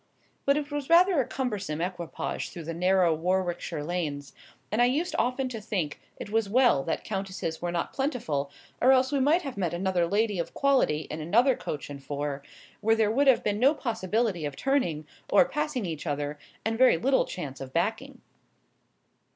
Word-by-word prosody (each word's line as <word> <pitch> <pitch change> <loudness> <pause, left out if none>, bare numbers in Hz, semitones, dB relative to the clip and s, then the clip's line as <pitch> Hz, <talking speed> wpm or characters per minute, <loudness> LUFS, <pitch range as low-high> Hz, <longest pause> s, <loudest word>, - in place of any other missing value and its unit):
But 280 +1 +4
it 295 0 -4
was 290 -1 -4
rather 345 -2 +6
a 245 - -4
cumbersome 205 - -3
equipage 175 -1 -4
through 170 - -8
the 165 +2 -5
narrow 180 0 +3
Warwickshire 175 -2 -1
lanes; 150 -4 -3 0.4
and 215 +3 +2
I - - +6
used 295 +8 0
often 255 +2 0
to 225 -3 -6
think 185 -9 -3 0.2
it 205 - -8
was 220 -2 +1
well 240 - +4
that 165 - -2
countesses 190 -5 -4
were 175 0 -2
not 170 -1 -2
plentiful, 235 - -2 0.3
or 260 +2 +6
else 260 +1 +3
we 285 - +1
might 305 +7 +3
have 275 -7 -6
met 175 -3 -1
another 180 -1 +1
lady 205 0 +1
of 170 - -4
quality 270 - +2
in 155 +1 -4
another 240 - +3
coach 145 - -5
and 140 -1 -9
four, 145 0 -3 0.4
where 225 +1 +3
there 220 -1 +2
would 275 +5 +2
have 265 - +5
been 205 0 0
no 275 +6 +5
possibility 220 - -1
of 145 -2 -3
turning, 175 - 0 0.2
or 275 - +6
passing 295 -4 -2
each 165 -1 -5
other, 145 0 -3 0.3
and 225 +1 -1
very 255 -9 +6
little 265 +10 +2
chance 140 -7 -6
of 130 -1 -7
backing. 220 - -2
200 Hz, 185 wpm, -27 LUFS, 165-260 Hz, 0.4 s, rather